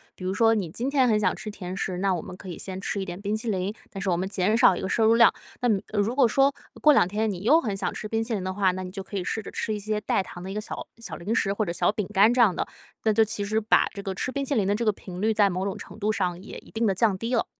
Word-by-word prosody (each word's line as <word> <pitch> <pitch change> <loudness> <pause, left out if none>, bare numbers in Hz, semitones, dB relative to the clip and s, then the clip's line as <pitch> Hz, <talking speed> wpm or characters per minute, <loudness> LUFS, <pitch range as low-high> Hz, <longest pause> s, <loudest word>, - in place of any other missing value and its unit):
比 - - -11
如 185 - 0
说 225 +2 +4
你 200 -5 -1
今 245 +9 -2
天 270 -3 +3
很 215 -3 +3
想 210 - +1
吃 215 - -6
甜 185 -2 -6
食， 180 -2 -2
那 195 -1 +1
我 170 - -4
们 - - -8
可 185 0 -10
以 175 - -6
先 190 -1 -6
吃 200 - -2
一 195 - -3
点 175 +1 -7
冰 210 +1 -1
淇 225 0 -2
淋， 190 0 -1 0.2
但 195 - -6
是 195 - -1
我 175 - +2
们 185 +2 -2
减 200 +2 +1
少 235 -6 +6
一 - - -5
个 190 - -3
摄 225 - +2
入 225 - +6
量， 230 0 +7 0.3
那 245 - +2 0.3
如 210 +4 +1
果 265 -3 +5
说 270 +5 +3 0.3
过 300 - +7
两 225 - +4
天 215 +3 -1
你 180 -2 -6
又 310 +9 +5
很 205 -7 -3
想 - - -2
吃 215 - -5
冰 225 +1 -1
淇 225 +1 -3
淋 200 -4 -2
的 185 - -2
话， 190 -1 +2
那 185 +1 -5
你 185 - -6
就 190 +1 -6
可 200 - -9
以 190 - -1
试 220 +4 -3
着 - - -8
吃 220 - -3
一 215 - -1
些 210 +1 -2
代 195 - +1
糖 175 - -10
的 185 - -7
一 - - -4
个 - - -1
小 - - -10 0.3
小 230 - -7
零 195 +6 -3
食 195 - +1
或 215 +1 -1
者 170 - -2
小 - - +2
饼 210 -2 -3
干 210 +4 +5
这 250 - 0
样 205 -7 +5
的， - - -1 0.4
那 220 - +3
就 225 +1 +5
其 210 -1 -4
实 215 +2 +1
把 220 0 +3
这 200 - -6
个 195 - -3
吃 255 - -2
冰 280 +1 -2
淇 280 - -1
淋 210 -5 +2
的 200 - +2
这 230 - -2
个 215 - +4
频 180 -2 -9
率 220 +1 +2
在 205 -2 +4
某 185 +1 -2
种 195 - -3
程 - - -10
度 215 +1 +1
上 180 -3 -1
也 - - -9
一 - - -18
定 230 +1 0
地 195 - +2
降 205 -1 +2
低 230 +5 -3
了。 230 - +1
205 Hz, 365 characters per minute, -26 LUFS, 190-225 Hz, 0.4 s, 量